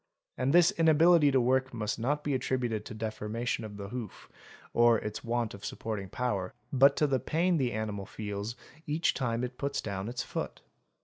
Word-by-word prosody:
And 130 +2 0
this 175 +1 +6
inability 165 -1 +5
to 135 -1 +3
work 130 +1 +1
must 105 0 -2
not 145 +6 0
be 145 - -1
attributed 125 -4 -1
to - - -7
defor 110 -1 -4
mation 115 +1 -2
of 105 -2 -7
the 100 -1 -6
hoof, 115 -4 -7 0.4
or 120 -1 +5
its 105 0 -5
want 120 -1 -1
of 100 - -11
supporting 105 -4 -4
power, 100 -5 -2 0.2
but 140 +1 +6
to 150 - +3
the 135 -3 +1
pain 170 +7 +1
the 130 -4 +1
animal 105 -3 -3
feels 105 +1 -5 0.3
each 155 +3 +1
time 120 -2 -1
it 125 0 -5
puts 140 0 -1
down 100 0 -4
its 125 - -3
foot. - - -5
120 Hz, 190 wpm, -30 LUFS, 110-140 Hz, 0.4 s, this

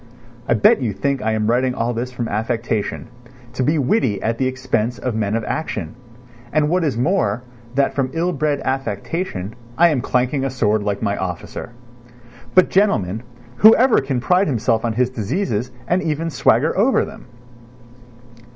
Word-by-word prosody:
I 120 - +3
bet 110 +5 +4
you 115 -5 -1
think 135 +8 -1
I 110 +1 0
am 110 -1 0
writing 125 +3 +1
all 120 +1 -1
this 120 +2 -3
from 120 -2 -4
affectation, 110 0 -2 0.5
to 130 - -3
be 150 +5 +2
witty 130 - +1
at 115 +1 -1
the 130 - +2
expense 125 -3 -1
of 125 - -3
men 110 -1 -1
of 115 - -1
action; 105 - -3 0.6
and 150 -1 +2
what 180 +1 +1
is 145 -7 0
more, 125 - +1 0.3
that 140 0 +2
from 135 -2 -1
ill 175 +2 0
bred 145 -1 0
affectation, 135 - -3 0.2
I 170 +1 +6
am 145 -6 0
clanking 130 +3 0
a 135 - 0
sword 110 -4 +1
like 100 +1 -2
my 100 -2 0
officer. 90 -3 -5 0.9
But, 185 - +6
gentlemen, 115 - +2 0.4
whoever 225 - +6
can 135 -2 -2
pride 180 +9 +2
himself 115 -4 +1
on 115 -1 0
his 125 +2 +1
diseases 125 - -2 0.2
and 180 +2 +2
even 165 0 -2
swagger 140 +2 +2
over 230 +7 +3
them? 210 +2 -12
125 Hz, 170 wpm, -20 LUFS, 110-155 Hz, 0.9 s, I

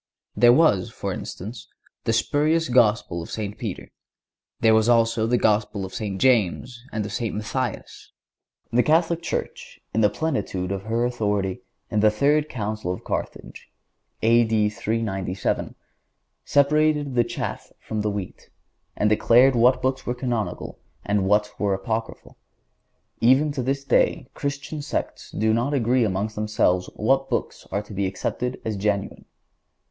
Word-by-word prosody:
There 120 0 +6
was, 125 - +4
for - - -4
instance, 110 +6 -7 0.4
the 115 - +1
spurious 155 +7 +1
Gospel 115 -7 +2
of 80 - -9
St. 105 -2 -4
Peter; 105 -6 -6 0.7
there 110 -1 +4
was 110 +1 +3
also 115 -1 +3
the 120 +1 +2
Gospel 105 -3 +1
of 95 - -10
St. 105 -5 -4
James 120 0 +1
and 110 -2 -2
of 105 - -6
St. 115 -1 -2
Matthias. 115 +3 -4 0.6
The 125 - +5
Catholic 165 +3 +2
Church, 170 - -5
in 110 - +2
the 105 - +5
plenitude 100 - -2
of 100 0 -4
her 115 +2 0
authority, 105 -6 -1 0.3
in 105 - +1
the 105 +1 +5
third 145 +7 +2
Council 110 -4 -3
of 90 - -6
Carthage, - - -5 0.5
(A. 115 +1 +5
D. 110 -2 +1
397,) 105 -4 -2 0.7
separated 150 0 +2
the 120 -1 +3
chaff 120 0 -5
from 110 -1 -4
the 105 - 0
wheat, 100 -3 -6 0.5
and 105 - +1
declared 120 +5 +5
what 125 +2 +4
Books 130 0 -1
were 120 - -1
Canonical, 120 -4 -3 0.3
and 100 -1 +1
what 105 +1 +2
were 100 -2 +1
apocryphal. 110 +4 -5 0.8
Even 130 +6 +4
to 140 -2 -3
this 135 +2 -1
day - - +2
the - - -23
Christian 140 +2 -4
sects - - -4
do 110 +1 +1
not 125 +6 0
agree 125 0 +2
among 100 0 -1
themselves 105 -4 0
as - - -14
to - - -11
what 135 +3 +2
books - - -3
are 100 +2 -1
to 105 - -12
be 100 0 0
accepted 125 +6 -3
as 110 -1 -2
genuine. 100 0 -2
115 Hz, 155 wpm, -24 LUFS, 105-130 Hz, 0.8 s, There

